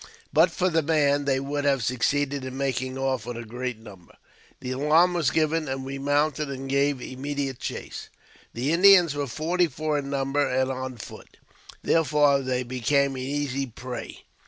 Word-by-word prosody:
But 165 +4 +5
for 180 +2 0
the 165 -2 +2
man, 145 -2 +2
they 135 -1 +1
would 145 +1 -3
have 135 -3 +2
succeeded 140 +3 0
in 130 0 -6
making 130 -1 -2
off 130 -3 -2
with 120 -1 -5
a 120 - -7
great 125 +1 -4
number. 100 -6 -15 0.4
The 130 -1 -5
alarm 155 +7 +3
was 165 -6 +1
given, 160 0 0
and 135 0 -4
we 135 +1 -5
mounted 145 +1 0
and 135 0 -6
gave 140 0 +1
immediate 135 +1 -4
chase. - - -6 0.5
The 130 +6 -1
Indians 180 -3 +6
were 145 -1 -3
forty 170 +7 0
four 155 +1 -2
in 140 -1 -6
number, 140 +1 0
and 130 0 0
on 130 -1 -5
foot; 105 - -11 0.5
therefore 150 -3 +3
they 130 -1 -1
became 130 +3 +1
an 130 -1 -5
easy 140 0 -2
prey. 125 +1 -8
140 Hz, 175 wpm, -25 LUFS, 130-150 Hz, 0.5 s, Indians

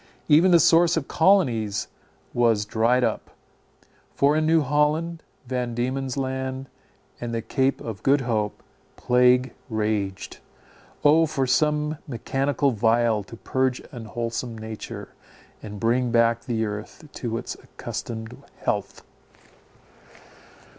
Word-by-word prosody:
Even 160 +5 +6
the 170 -1 +6
source 165 +2 +5
of 145 - -2
colonies 125 - +2 0.5
was 115 -4 +2
dried 115 +4 +2
up, 115 -2 -1 0.9
for 140 +2 +3
in 155 0 +1
New 160 0 +4
Holland, 150 +4 0 0.2
Van 125 -1 -3
Diemen's 130 +2 -2
Land, 130 0 -3 0.5
and 120 -1 -4
the 115 - -1
Cape 135 +3 0
of 110 -4 -7
Good 140 +1 +3
Hope, 110 -4 -2 0.3
plague 125 0 +3 0.2
raged. 105 -3 -2 0.6
O, 160 +2 +5
for 135 -3 -1
some 150 +3 +1
medicinal 135 +2 0
vial 115 -1 +2
to 110 - -11
purge 130 +2 -1
unwholesome 115 0 -4
nature, 110 0 -7 0.5
and 105 -1 -8
bring 120 +3 +1
back 115 0 +2
the 115 -3 -1
earth 105 +8 -7
to 115 -2 -3
its - - -5
accustomed 110 -1 -7 0.3
health! - - -2
125 Hz, 120 wpm, -24 LUFS, 115-145 Hz, 0.9 s, Even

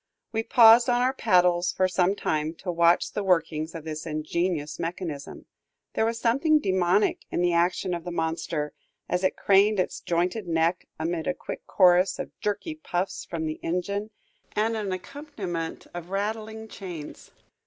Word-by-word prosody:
We 225 - 0
paused 230 +1 +7
on 245 0 +3
our 260 +1 +2
paddles 180 -6 +3
for 185 +1 +2
some 185 +1 +1
time, 155 -3 -1
to 180 +2 -4
watch 170 0 +3
the 205 - -3
workings 165 -3 0
of 165 - -6
the 155 -1 -5
ingenious 155 0 -2
mechanism. 165 -4 -5 0.5
There 220 - +1
was 230 0 -1
something 275 +7 +3
demoniac 190 -4 +2
in - - -1
the 175 -1 +2
action 175 +2 +1
of 170 -1 -4
the 175 - -5
monster, 160 -2 -2 0.3
as 180 +1 -1
it 185 - +1
craned 200 +1 +4
its 185 - -1
jointed 180 +4 -1
neck 165 +1 0
amid 165 +1 -2
a 180 - 0
quick - - -8
chorus 180 0 +4
of - - -5
jerky 210 +10 -2
puffs 195 - -3
from 165 -2 -4
the 155 0 -4
engine 200 +5 -2 0.5
and 220 +2 +1
an 210 -3 -3
accompaniment 185 - -5
of 175 0 -7
rattling 220 +2 -3
chains. 180 -8 -9
180 Hz, 165 wpm, -26 LUFS, 170-210 Hz, 0.5 s, paused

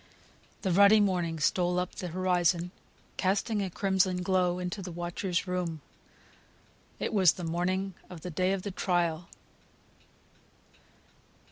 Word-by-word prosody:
The 190 - +1
ruddy 200 +4 +7
morning 175 -5 0
stole 175 +4 +1
up 180 0 -2
the 180 - -5
horizon, 175 0 +1 0.5
casting 205 +3 0
a 195 - -2
crimson 185 -1 +1
glow 180 -1 +1
into 180 +2 -4
the 180 -1 -6
watcher's 175 +1 -2
room. 180 -3 -2 1.2
It - - -3
was 185 -5 +5
the 180 - -8
morning 185 +3 -1 0.2
of 175 -3 -9
the 180 - -6
day 185 +3 +1
of 195 -1 -2
trial! 175 -2 0
180 Hz, 125 wpm, -29 LUFS, 175-190 Hz, 1.2 s, ruddy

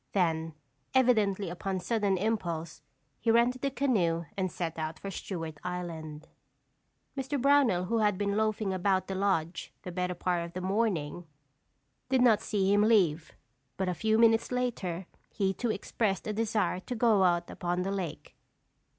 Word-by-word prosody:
Then, 165 -4 0 0.4
evidently 215 -7 +3
upon 190 +1 -3
sudden 200 0 0
impulse, 170 -7 -2 0.4
he 230 - -1
rented 240 +2 +3
the 275 - +1
canoe 190 -12 +1
and 185 -2 -1
set 165 -2 -4
out 155 0 -3
for 195 +5 -6
Stewart 165 -5 -5
Island. 165 -4 -5 0.9
Mr. 270 +1 -2
Brownell 265 -9 +4
who 230 +4 0
had 210 -3 +2
been 200 0 0
loafing 215 -2 0
about 185 0 +1
the 195 - -4
lodge 190 -4 -1
the 180 - -6
better 180 0 -2
part 175 0 0
of 170 0 -8
the 185 - -4
morning, 180 -5 -1 0.8
did 260 -1 +3
not 225 -4 +5
see 200 -2 +1
him 205 - +4
leave, 185 -8 +3 0.4
but 190 - -1
a - - 0
few 220 +5 +1
minutes 225 0 +4
later, 205 -8 -2 0.2
he 195 -2 0
too 240 +4 -2
expressed 210 -1 -1
a 215 - -2
desire 215 -3 0
to 245 +6 -6
go 220 -4 +4
out 175 -1 +2
upon 175 0 -2
the 195 - -2
lake. 185 -6 -5
195 Hz, 160 wpm, -30 LUFS, 175-220 Hz, 0.9 s, not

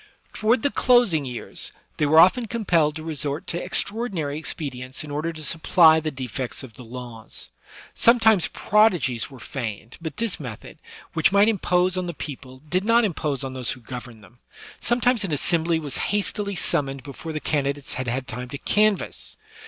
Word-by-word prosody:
Toward 225 +2 +2
the 285 - +2
closing 240 - +3
years, 125 -2 -5 0.3
they 150 - +2
were 155 +2 +4
often 225 +8 +5
compelled 175 -9 +1
to 160 - -5
resort 150 -2 -4
to 170 - -3
extraordinary 190 -10 -2
expedients 130 -5 -5
in 150 - -8
order 155 +3 -2
to 155 -1 -8
supply 160 +1 +5
the 155 0 -2
defects 130 -1 -5
of 125 -4 -10
the 125 - -12
laws. 120 -2 -9 0.4
Sometimes 225 -5 +5
prodigies 180 - +2
were 135 - -12
feigned; 115 -2 -6
but 160 -3 -6
this 230 -4 0
method, 125 -8 -9 0.3
which 160 - +3
might 200 +2 +5
impose 185 -3 +1
on 180 -1 -2
the 170 - -5
people, 130 -2 -8
did 185 +4 0
not 230 +2 +4
impose 150 -7 -2
on 135 -1 -5
those 130 -3 -2
who 130 - -12
governed 120 -2 -9
them. 120 +5 -19 0.4
Sometimes 240 -1 +2
an 190 - -3
assembly 165 +3 +1
was 150 -4 -5
hastily 205 0 0
summoned 135 -5 0
before 145 +4 -7
the 155 - -3
candidates 140 -2 -1
had 130 0 -4
had 125 +2 -2
time 125 +3 -6
to 140 - -5
canvass. 210 +4 0
155 Hz, 175 wpm, -24 LUFS, 130-195 Hz, 0.4 s, often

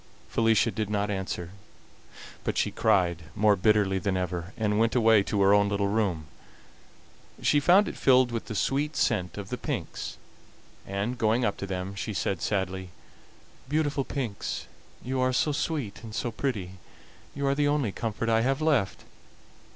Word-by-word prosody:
Felicia 115 -3 +3
did 110 -2 -3
not 105 0 0
answer, 95 -3 -4 0.9
but - - -2
she - - +1
cried 90 -3 +2
more 105 0 +4
bitterly 100 -1 +2
than 95 +1 -1
ever, 90 -1 -3
and 105 -1 +1
went 115 +1 +2
away 115 -3 +5
to 100 0 0
her 100 +1 +6
own 100 0 +4
little 100 0 0
room. 100 -7 0 1.2
She 145 - +4
found 180 +8 +5
it - - -5
filled 130 -2 +4
with 115 -1 -3
the 110 - -6
sweet 145 +7 0
scent 90 -8 0
of 100 -1 -6
the 125 - -4
pinks, 120 - -4 0.7
and, 100 +5 -3
going 115 +2 +2
up 100 - 0
to 100 - -5
them, 95 0 -4
she 100 +1 -4
said 95 -3 -1
sadly: 95 -2 -2 0.8
"Beautiful 145 -2 0
pinks, 125 -8 -4 0.4
you 130 +1 -2
are 130 0 +2
so 145 +4 +1
sweet 145 -7 -3
and 110 -2 -8
so 120 -1 -2
pretty, 95 -9 -3 0.6
you 140 0 -2
are 135 - +3
the 145 +1 +1
only 145 -7 +1
comfort 115 +2 -3
I 115 0 +3
have 135 +3 +1
left. 145 -11 +1
110 Hz, 165 wpm, -27 LUFS, 95-130 Hz, 1.2 s, her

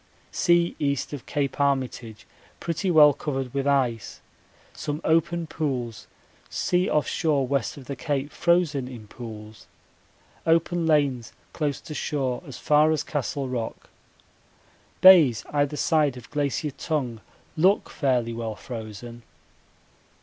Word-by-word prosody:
Sea 170 -1 +2
east 140 -1 -1
of 140 - -7
Cape 145 -2 -2
Armitage 130 -5 -1 0.3
pretty 170 +3 -2
well 150 -4 +7
covered 135 -3 -4
with 140 0 -1
ice; 125 -6 0 0.5
some 145 0 -4
open 165 +1 +1
pools 130 -8 -4 0.4
sea 180 +1 0
off 150 - +1
shore 145 -4 +1
west 135 -1 -1
of 135 - -11
the 140 - -5
Cape 145 +1 -2
frozen 170 -7 +1
in 120 -4 -9
pools, 110 -2 -10 0.8
open 165 +1 +2
lanes 140 -7 +1 0.2
close 150 -3 -2
to 155 - -8
shore 135 -4 -2
as 135 - -8
far 150 +1 +4
as 155 - 0
Castle 140 -1 -3
Rock. 120 -3 -5 1.1
Bays 165 - +7
either 145 0 0
side 150 -6 +2
of 115 -4 -12
Glacier 145 +1 -1
Tongue 135 -6 -3 0.3
look 185 +6 +3
fairly 125 -5 0
well 115 -2 -4
frozen. 115 +1 -8
140 Hz, 130 wpm, -25 LUFS, 125-155 Hz, 1.1 s, well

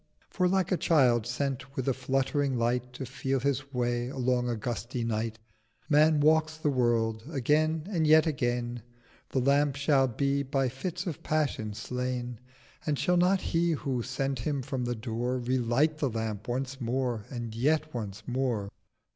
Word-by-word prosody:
For 180 -1 +2
like 190 0 +1
a 185 - +3
Child 125 -10 +3
sent 135 +2 -3
with 130 - -3
a 135 - +3
fluttering 135 +1 0
Light 120 +1 0
To 130 - -5
feel 135 +1 -1
his 140 +1 -1
way 120 -1 0
along 125 -1 0
a 120 - 0
gusty 120 +2 -3
Night 110 0 -2 0.5
Man 155 0 +5
walks 155 +1 +3
the 150 -2 0
World: 115 -3 +1
again 155 +2 +1
and 170 -6 +1
yet 155 +1 +7
again 120 -5 -1 0.5
The - - -3
Lamp 140 +2 +3
shall 140 -2 +3
be 140 +3 0
by 135 -1 0
Fits 175 +8 -4
of 170 -6 -4
Passion 135 -9 -1
slain: 125 +1 -3 0.4
But 150 -2 0
shall 180 - +2
not 180 +2 +3
He 170 0 +1
who 135 -5 -2
sent 135 +1 -2
him 140 +2 -2
from 130 -2 -3
the 120 0 -1
Door 120 +2 -2
Relight 130 +5 +1
the 140 - +1
Lamp 110 -2 -4
once 130 +2 -3
more, 120 -2 -1
and 120 -3 -5
yet 155 +6 +1
once 110 -3 -5
more? 120 -6 -1
130 Hz, 165 wpm, -29 LUFS, 120-145 Hz, 0.5 s, yet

